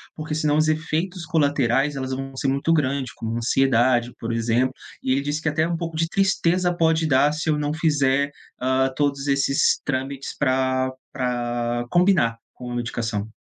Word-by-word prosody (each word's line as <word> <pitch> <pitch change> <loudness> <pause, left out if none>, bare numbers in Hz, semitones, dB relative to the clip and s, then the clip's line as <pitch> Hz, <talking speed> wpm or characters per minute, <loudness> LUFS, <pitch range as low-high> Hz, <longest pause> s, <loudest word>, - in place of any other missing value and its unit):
porque 155 0 -5
senão 150 -1 +1
os 155 0 +3
efeitos 165 +3 -1
colaterais, 145 -4 +1
elas 130 -1 -4
vão 135 0 -5
ser 135 - -2
muito 140 +5 +1
grande, 140 -4 0
como 115 0 -4
ansiedade, 120 0 +2
por 115 0 -3
exemplo. 115 +3 +1 0.3
E 130 - 0
ele 135 +2 +2
disse 145 +2 -2
que 160 - 0
até 155 +2 +1
um 170 -1 -2
pouco 165 -1 -5
de 165 +1 +1
tristeza 180 -2 +1
pode 160 -1 +2
dar 145 +1 +4
se 155 +2 -4
eu 150 - 0
não 145 0 -1
fizer, 145 -3 +1 0.3
ah, 130 +1 +1
todos 145 -1 0
esses 140 0 +2
trâmites 135 0 -3
pra 130 -1 +1 0.2
pra 120 -2 -2
combinar 175 -10 +3 0.2
com 125 -1 -8
a - - -4
medicação. 115 -3 -3
140 Hz, 175 wpm, -23 LUFS, 130-155 Hz, 0.3 s, dar